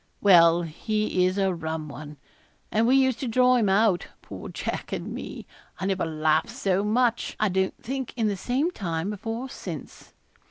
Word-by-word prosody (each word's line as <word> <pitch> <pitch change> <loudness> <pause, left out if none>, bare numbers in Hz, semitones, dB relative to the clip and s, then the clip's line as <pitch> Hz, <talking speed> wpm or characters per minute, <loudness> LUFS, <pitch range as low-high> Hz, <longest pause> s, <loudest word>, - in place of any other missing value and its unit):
Well, 170 -3 +6
he 185 +3 0
is 185 +2 -2
a 195 -1 +2
rum 160 -2 -4
one; 150 +1 -9 0.5
and 225 +2 +2
we 260 - +5
used 260 -3 +3
to 265 - -3
draw 250 +2 +4
him 215 -5 +2
out 195 -2 +3 0.2
poor - - -8
Jack - - -4
and - - -4
me. - - -7 0.3
I 190 - -3
never 190 -2 0
laughed 155 +5 +1
so 200 -6 0
much, 235 +2 +1
I 215 - +2
don't 190 0 0
think, 265 +1 -4
in 225 -2 +1
the 205 - 0
same 260 - 0
time, 175 - -3
before 225 +4 -4
or - - -9
since. 165 - -9
200 Hz, 185 wpm, -26 LUFS, 170-235 Hz, 0.5 s, Well